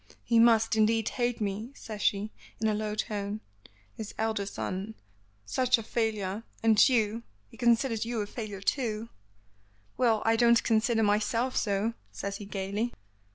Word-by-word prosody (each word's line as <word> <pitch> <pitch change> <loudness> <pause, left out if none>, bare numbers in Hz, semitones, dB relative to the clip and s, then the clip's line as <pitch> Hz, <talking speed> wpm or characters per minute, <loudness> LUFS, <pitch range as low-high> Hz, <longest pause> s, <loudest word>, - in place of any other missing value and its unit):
"He 230 -1 +3
must, 225 -1 +5
indeed, 220 0 +3
hate 245 -2 -1
me," 215 +5 -3
says 215 -2 -8
she, 205 +2 +1 0.3
in 220 - +1
a 215 - +2
low 210 0 -2
tone. 210 -1 -3 0.5
"His 215 -2 -7
elder 220 -3 -1
son 200 +2 -4 0.5
such 255 - +2
a 225 - -6
failure, 215 -3 -1 0.2
and 225 +3 +6
you 225 -2 +1 0.3
he - - -16
considers 235 -1 +2
you 230 0 -3
a - - -2
failure, 205 -2 -6
too." 225 0 -1 0.9
"Well, 230 -4 +2
I 225 0 +4
don't 235 0 +5
consider 225 0 +2
myself 220 +4 +1
so," 210 +2 0 0.2
says 200 0 -4
he, 205 - -8
gaily. 200 +4 -3
220 Hz, 155 wpm, -29 LUFS, 205-230 Hz, 0.9 s, and